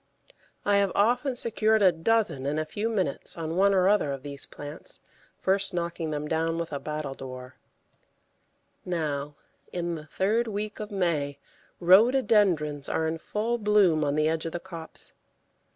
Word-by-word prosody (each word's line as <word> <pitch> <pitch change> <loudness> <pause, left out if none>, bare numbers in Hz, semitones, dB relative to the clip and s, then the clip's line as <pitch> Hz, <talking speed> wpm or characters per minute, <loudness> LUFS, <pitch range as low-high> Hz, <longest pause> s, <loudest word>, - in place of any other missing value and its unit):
I 205 0 +4
have 200 -2 +2
often 245 +6 +2
secured 220 -2 +1
a 185 - +7
dozen 170 -5 +1
in 145 +2 -1
a 155 - 0
few 210 +7 -2
minutes 185 -11 -1
on 165 0 -3
one 200 +2 +4
or 185 -1 +3
other 200 -8 +3
of 135 -1 -5
these 140 -1 -5
plants, 145 +1 -10 0.4
first 195 0 +1
knocking 170 -2 -2
them 150 0 -3
down 165 +1 0
with 170 -2 -4
a 140 - -2
battledore. 135 -4 -6 1.3
Now, 150 -4 -2 0.4
in 175 -1 -2
the 155 -1 -7
third 220 +8 +1
week 210 0 -4
of 210 -1 -5
May, 165 -8 -1 0.4
Rhododendrons 185 - +4
are 160 - 0
in 160 +1 -2
full 230 +7 -2
bloom 205 -7 +4
on 145 0 0
the 155 0 +2
edge 160 +1 -1
of 165 - -6
the 175 - -2
copse. 170 -3 -5
170 Hz, 160 wpm, -27 LUFS, 150-205 Hz, 1.3 s, a